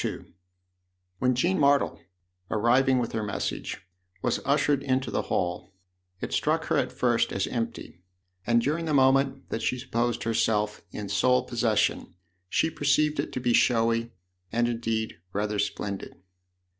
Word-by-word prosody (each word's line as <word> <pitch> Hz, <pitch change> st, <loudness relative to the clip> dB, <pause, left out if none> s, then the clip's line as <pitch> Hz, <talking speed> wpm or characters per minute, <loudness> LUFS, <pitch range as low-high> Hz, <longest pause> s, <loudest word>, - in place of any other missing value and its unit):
II -, -, -4 dB, 0.9 s
WHEN 125 Hz, 0 st, +2 dB
Jean 175 Hz, +9 st, +1 dB
Martle, 140 Hz, -1 st, +3 dB, 0.5 s
arriving 125 Hz, +4 st, +3 dB
with 120 Hz, -2 st, -1 dB
her 110 Hz, -, -2 dB
message, 105 Hz, -2 st, -3 dB, 0.4 s
was 120 Hz, -, +1 dB
ushered 145 Hz, 0 st, +2 dB
into 130 Hz, -1 st, -1 dB
the -, -, 0 dB
hall, 90 Hz, +2 st, -2 dB, 0.5 s
it -, -, -4 dB
struck -, -, +1 dB
her -, -, +1 dB
at -, -, 0 dB
first 120 Hz, -2 st, +1 dB
as 95 Hz, -, 0 dB
empty, 115 Hz, -7 st, -5 dB, 0.5 s
and 120 Hz, 0 st, +3 dB
during 155 Hz, +5 st, -1 dB
the 155 Hz, -2 st, 0 dB
moment 135 Hz, 0 st, +3 dB
that 115 Hz, -, -3 dB
she 125 Hz, -, 0 dB
supposed 120 Hz, -2 st, -1 dB
herself 110 Hz, -2 st, 0 dB
in 105 Hz, -1 st, -6 dB
sole 125 Hz, +6 st, +3 dB
possession 115 Hz, -7 st, 0 dB, 0.3 s
she 160 Hz, -, +1 dB
perceived 150 Hz, +1 st, +1 dB
it -, -, -2 dB
to -, -, -3 dB
be 120 Hz, -1 st, +1 dB
showy 115 Hz, -1 st, +2 dB, 0.4 s
and 120 Hz, +1 st, +1 dB
indeed 115 Hz, -4 st, -2 dB
rather 105 Hz, +1 st, -1 dB
splendid. 100 Hz, -1 st, -3 dB
120 Hz, 145 wpm, -27 LUFS, 110-130 Hz, 0.9 s, Martle